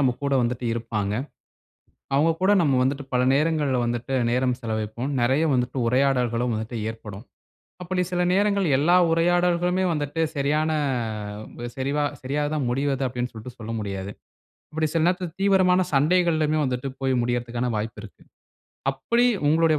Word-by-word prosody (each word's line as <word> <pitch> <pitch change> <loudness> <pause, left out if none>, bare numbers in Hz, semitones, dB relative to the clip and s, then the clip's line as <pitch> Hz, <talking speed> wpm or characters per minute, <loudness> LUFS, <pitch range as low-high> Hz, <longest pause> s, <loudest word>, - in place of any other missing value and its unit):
நம்ம 130 -3 +3
கூட 140 -1 +1
வந்துட்டு 120 0 -2
இருப்பாங்க. 110 -3 -2 1.0
அவங்க 155 +4 +4
கூட 190 +2 +4
நம்ம 145 -5 +2
வந்துட்டு 140 +1 -1
பல 125 0 +2
நேரங்கள்ல 150 -3 +1
வந்துட்டு 120 +3 -2 0.2
நேரம் 125 0 +1
செலவைப்போம். 110 +2 -3
நெறைய 130 +6 +2
வந்துட்டு 125 0 0
உரையாடல்களும் 125 -2 +1
வந்துட்டு 110 +2 -4
ஏற்படும். 110 -1 -8 0.6
அப்டி 180 +1 -1
சில 180 0 +1
நேரங்கள் 200 0 +2
எல்லா 165 +6 +4
உரையாடல்களுமே 175 +2 +2
வந்துட்டு 150 +1 -2 0.2
சரியான 150 +3 +1 1.1
சரிவா 140 +3 0 0.2
சரியாதா 145 +3 -1
முடிவது 135 +1 0
அப்டின்னு 125 0 -3
சொல்ட்டு 120 +3 -9
சொல்ல 115 0 -6
முடியாது. 100 -2 -4 0.6
அப்டி 155 0 0
சில 165 - +2
நேரத்தில 180 -1 0
தீவிரமான 185 -2 +4
சண்டைகள்லுமே 155 0 +2
வந்துட்டு 130 +1 -2
போய் 135 -1 +1
முடியற்த்துக்கான 120 0 -1
வாய்ப்பு 110 0 -4
இருக்கு. 105 - -13 0.7
அப்டி 235 - +1 0.2
உங்களுடைய 160 0 +3
135 Hz, 135 wpm, -24 LUFS, 120-165 Hz, 1.1 s, அவங்க